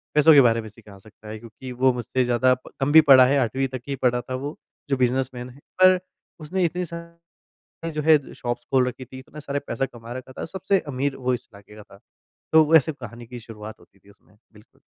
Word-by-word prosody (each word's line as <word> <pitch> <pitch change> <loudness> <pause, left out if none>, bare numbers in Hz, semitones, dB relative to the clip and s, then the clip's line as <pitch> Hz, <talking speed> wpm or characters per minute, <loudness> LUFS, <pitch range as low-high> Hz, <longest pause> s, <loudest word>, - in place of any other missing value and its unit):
पैसों 150 +2 +7
के 145 - +8
बारे 115 -2 +3
में 110 - -10
सिखा 105 -2 -16
सकता 105 +1 -16
है 110 0 -7
क्योंकि 115 +3 -11
वो 130 +1 +2
मुझसे 125 +1 -1
ज़्यादा 125 +1 +3
प - - -13
कम 135 +2 0
भी 160 +1 +9
पड़ा 130 -1 +9
है 140 +2 +2
8वीं 130 +2 0
तक 130 -1 -6
ही 140 - -1
पड़ा 125 0 +2
था 130 +2 -6
वो 145 - -6 0.3
जो 135 - +1
बिज़नेसमैन 125 0 -1
है 130 +3 -16 0.2
पर 185 0 +7 0.4
उसने 180 +5 -2
इतनी 180 +2 -2
सा 170 0 -5 0.9
जो 150 - -2
है 155 +1 +6 0.2
शॉप्स 120 0 -4
खोल 130 -1 +4
रखी 130 +1 -8
थी, 130 +1 -12
इतना 140 +3 -12
सारे 140 -1 -3
पैसा 115 +3 -2
कमा 120 -2 -11
रखा 130 +1 -8
था। - - -6
सबसे 195 +1 0
अमीर 135 0 -2
वो 130 -1 -1
इस 120 +1 -8
इलाके 100 +1 -16
का 105 - -11
था। 100 - -18 0.5
तो 160 0 +7
वैसे 160 -1 +5
कहानी 120 -3 -11
की 125 +1 -9
शुरुआत 110 -1 -11
होती - - -23
थी 100 +2 -22
उसमें 100 0 -25 0.2
बिल्कुल। 105 +1 -21
130 Hz, 230 wpm, -23 LUFS, 115-140 Hz, 0.9 s, भी